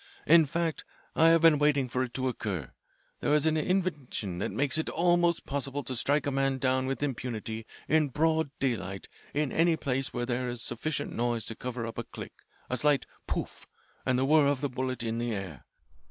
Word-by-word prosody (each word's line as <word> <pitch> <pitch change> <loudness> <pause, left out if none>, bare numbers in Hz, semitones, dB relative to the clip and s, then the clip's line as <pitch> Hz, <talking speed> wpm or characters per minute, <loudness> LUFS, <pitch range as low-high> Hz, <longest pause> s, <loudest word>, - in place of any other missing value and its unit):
In 165 0 +6
fact 165 +1 -1 0.3
I 165 +1 +6
have 165 -1 +5
been 160 -3 +7
waiting 145 -3 +3
for 125 +1 -1
it 125 -2 -3
to 130 0 0
occur. 95 - -3 0.5
There 145 - +2
is 150 0 +3
an 160 0 +3
invention 150 - -1
that - - -1
makes 145 +2 +1
it 160 - -2
almost 175 0 +2
possible 140 0 -2
to 130 - -3
strike 140 +5 +2
a 140 - 0
man 135 0 +1
down 130 0 +1
with 135 +2 -2
impunity 115 -4 -4 0.2
in 155 -1 +3
broad 160 +2 +1
daylight 100 -7 -2 0.3
in 150 -2 +1
any 165 0 +3
place 135 -3 -1
where 120 0 -2
there 125 0 -1
is 120 -1 -3
sufficient 145 +5 -2
noise 120 -1 -1
to 115 - -5
cover 125 -1 -4
up 115 - -5
a - - -2
click, - - -9 0.3
a 125 - -1
slight 145 +2 +2 0.2
'Pouf!' - - -4 0.4
and 130 -1 +1
the 130 - +2
whir 150 0 +5
of 140 -2 +1
the 145 - 0
bullet 130 -1 -2
in 115 0 -2
the 120 -2 -1
air. 95 -9 -7
135 Hz, 200 wpm, -29 LUFS, 120-150 Hz, 0.5 s, been